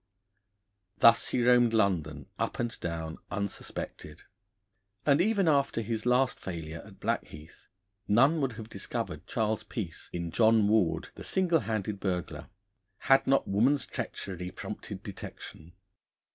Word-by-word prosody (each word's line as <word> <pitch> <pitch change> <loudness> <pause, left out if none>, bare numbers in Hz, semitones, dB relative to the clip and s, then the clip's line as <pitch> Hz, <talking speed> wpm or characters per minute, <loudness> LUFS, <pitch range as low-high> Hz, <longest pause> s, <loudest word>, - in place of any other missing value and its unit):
Thus 115 +2 +6
he 125 - 0
roamed 120 -2 +5
London 80 -9 +1
up - - -1
and 120 0 -3
down 80 -1 -4
unsuspected, 100 -5 -5 0.8
and 145 +2 +4
even 200 -2 +2
after 140 -5 +2
his 110 +1 -3
last 125 +1 +3
failure 80 -3 -6
at - - -15
Blackheath, 75 +1 -4 0.4
none 135 +9 +4
would 135 -3 0
have 110 -1 -8
discovered - - -4
Charles 110 -1 0
Peace 90 - -6
in 85 -1 -4
John 110 -1 +4
Ward, 105 -5 +2
the - - -10
Single 175 -3 +2
Handed 105 -3 -3
Burglar, 90 -3 -3 0.5
had 135 -1 +3
not 135 0 +3
woman's 125 +8 +3
treachery 90 -2 -5
prompted - - -7
detection. 80 +2 -9
110 Hz, 130 wpm, -29 LUFS, 90-125 Hz, 0.8 s, Thus